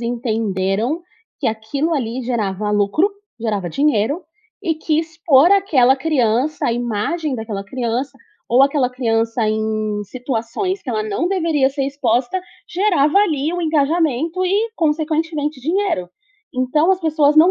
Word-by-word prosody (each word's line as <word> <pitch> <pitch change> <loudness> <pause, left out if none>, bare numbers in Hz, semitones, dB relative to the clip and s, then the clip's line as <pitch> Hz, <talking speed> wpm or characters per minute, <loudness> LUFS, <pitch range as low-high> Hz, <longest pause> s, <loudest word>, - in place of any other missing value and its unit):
entenderam 225 - -1 0.4
que - - -1
aquilo 225 +9 -2
ali 250 -1 -2
gerava 210 -4 -2
lucro, 210 - +2 0.3
gerava 210 -6 -2
dinheiro 285 - +1 0.4
e 330 -4 0
que 310 0 0
expor 315 -1 +3
aquela 285 -11 +4
criança, 265 -1 +1
a - - +1
imagem 245 +6 -2
daquela 220 -4 -5
criança 250 +5 -3 0.3
ou 245 +3 +5
aquela 275 -2 +2
criança 225 -2 0
em 215 -1 -1
situações 250 - -3
que - - -11
ela 215 -2 -1
não 215 +10 -1
deveria 325 -8 +2
ser 275 -1 -2
exposta, 260 +4 0 0.3
gerava 355 -3 +2
ali 310 -6 +1
o 355 - -2
engajamento 320 +2 +1
e 415 +5 +1
consequentemente 310 -2 -1
dinheiro. 335 - -1 0.5
Então 255 +7 +2
as 375 - -2
pessoas 310 -3 +3
não 325 +4 +7
270 Hz, 135 wpm, -19 LUFS, 225-320 Hz, 0.5 s, não